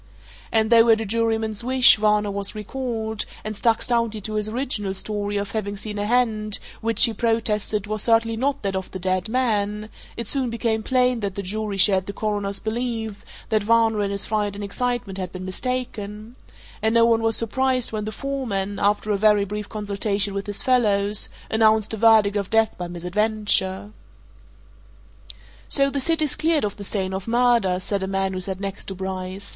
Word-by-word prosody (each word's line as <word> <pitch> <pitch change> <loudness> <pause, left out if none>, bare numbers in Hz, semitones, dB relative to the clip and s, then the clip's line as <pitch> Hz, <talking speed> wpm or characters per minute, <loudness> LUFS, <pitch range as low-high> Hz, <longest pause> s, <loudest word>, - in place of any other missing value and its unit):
And 220 0 +2
though, 230 0 +6
at 220 -1 +5
a 225 - -3
juryman's 225 0 -1
wish, 255 0 +6
Varner 210 -1 +2
was 200 0 -3
recalled, 220 -1 -4 0.2
and 215 0 -4
stuck 225 +2 +1
stoutly 230 -3 0
to 215 +2 -5
his 215 0 0
original 215 -5 -3
story 205 0 -3
of 200 0 -3
having 205 -2 -3
seen 210 0 -5
a 205 - -1
hand 215 -3 +1 0.2
which, 230 +3 +4
he 230 - 0
protested, 215 -2 0
was 215 0 -3
certainly 230 0 +2
not 275 +3 -1
that 195 -1 -1
of 190 -1 -4
the - - -6
dead 185 +2 -1
man, 215 -4 0 0.3
it 235 - -4
soon 265 -1 0
became 230 -1 -1
plain 250 0 +2
that 200 -3 -3
the 200 - -4
jury 210 +1 -3
shared 190 -1 +4
the 200 - -5
Coroner's 205 -2 -2
belief 220 -2 -4 0.3
that 215 -1 +2
Varner 225 0 +3
in 200 - 0
his 200 0 -2
fright 205 -2 -1
and 205 - -6
excitement 235 -1 -3
had 185 -1 -4
been 185 0 -7
mistaken, 215 0 -4 0.5
and 220 +1 +1
no 230 0 +6
one 230 -1 +3
was 225 -1 +3
surprised 255 +2 0
when 215 -1 -3
the 215 - -4
foreman, 215 -7 -3
after 205 +1 +1
a 205 - +2
very 210 -1 +4
brief 210 +1 -5
consultation 205 -1 -1
with 200 +1 -4
his 205 -1 -3
fellows, 210 -5 +2 0.2
announced 220 -1 +3
a - - -3
verdict 215 -2 +5
of 200 -2 -2
death 225 0 +2
by 180 - -5
misadventure. 190 +2 0 1.8
"So 275 0 +3
the 280 - -1
city's 310 0 +1
cleared 315 -5 +1
of 205 - -4
the 205 - -7
stain 190 -1 -2
of 190 +2 -5
murder!" 235 -6 +2
said 200 +1 -2
a 190 - -2
man 195 0 -1
who 185 - -3
sat 190 0 -4
next 195 0 -3
to 195 - -6
Bryce. 190 +1 -5
215 Hz, 190 wpm, -23 LUFS, 200-230 Hz, 1.8 s, though